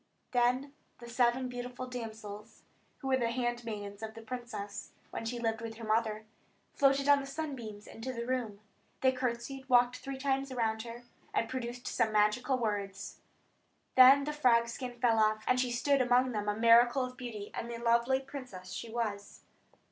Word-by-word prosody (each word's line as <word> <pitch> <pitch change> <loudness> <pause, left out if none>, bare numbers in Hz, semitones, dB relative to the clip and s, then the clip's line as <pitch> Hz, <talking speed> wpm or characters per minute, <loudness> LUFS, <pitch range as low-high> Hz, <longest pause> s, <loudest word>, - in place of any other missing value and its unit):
Then 255 +3 +1 0.2
the 240 - -11
seven 245 +1 +2
beautiful 250 0 -6
damsels, 220 -3 -8 0.3
who 270 - -7
were 260 - +4
the 235 -2 0
handmaidens 230 -4 -3
of 220 0 -6
the 225 - -9
princess 225 -4 -6 0.2
when - - -5
she 240 +2 -3
lived 225 -1 -1
with 225 -1 -6
her 230 - -10
mother 215 0 0 0.5
floated 275 0 +3
on 285 -1 +7
the 275 - -6
sunbeams 270 -8 -6
into 230 +3 -6
the 235 -2 -4
room. 235 -5 -2 0.4
They 260 - +5
curtsied, 255 +1 -4
walked 245 0 +5
three 275 0 -6
times 270 0 -1
round 220 -3 0
her, 235 +1 -8 0.3
and 230 - +1
pronounced 245 -1 -5
some 220 - +1
magical 215 +5 +2
words. 205 -4 -3 0.7
Then 265 +2 +8
the 300 +1 -3
frog 235 -5 +3
skin 245 0 -6
fell 230 -3 +3
off 215 0 +2
her, - - -6
and 255 0 +4
she 250 0 +1
stood 270 +3 +2
among 250 +1 +3
them 210 -2 -2
a 210 - -1
miracle 240 +3 +5
of 255 0 -9
beauty, 230 -5 -7
and 235 - -4
the 235 - -4
lovely 235 +3 +2
princess 255 -10 -8
she 235 - -5
was. 215 -3 -4
240 Hz, 180 wpm, -32 LUFS, 220-255 Hz, 0.7 s, Then